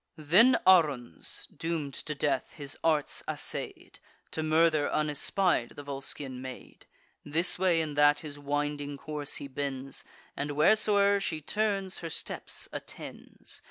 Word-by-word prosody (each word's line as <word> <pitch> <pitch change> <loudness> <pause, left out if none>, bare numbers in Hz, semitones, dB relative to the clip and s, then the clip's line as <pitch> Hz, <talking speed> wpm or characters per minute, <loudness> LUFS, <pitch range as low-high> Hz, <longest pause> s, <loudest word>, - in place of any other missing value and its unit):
Then 180 - +5
Aruns, 145 - +2
doom'd 160 -4 -3
to 150 +4 -4
death, 140 -2 -1
his 145 -1 -7
arts 155 -3 +1
assay'd, - - -4 0.3
To 160 - -2
murder, 155 -1 +3
unespied, 150 -1 +1
the 145 - -8
Volscian 135 -2 -4
maid: 130 -1 -10 0.4
This 165 +5 +2
way 180 -3 +3
and 155 -2 -4
that 145 0 +5
his 145 -2 -8
winding 145 0 -2
course 150 -1 -3
he 140 - -2
bends, 135 -1 -4 0.3
And, 145 +1 -3
whereso'er 200 +5 +4
she 160 -5 -2
turns, 195 +2 -1
her 165 - -5
steps - - -2
attends. - - -8
150 Hz, 130 wpm, -29 LUFS, 145-170 Hz, 0.4 s, Then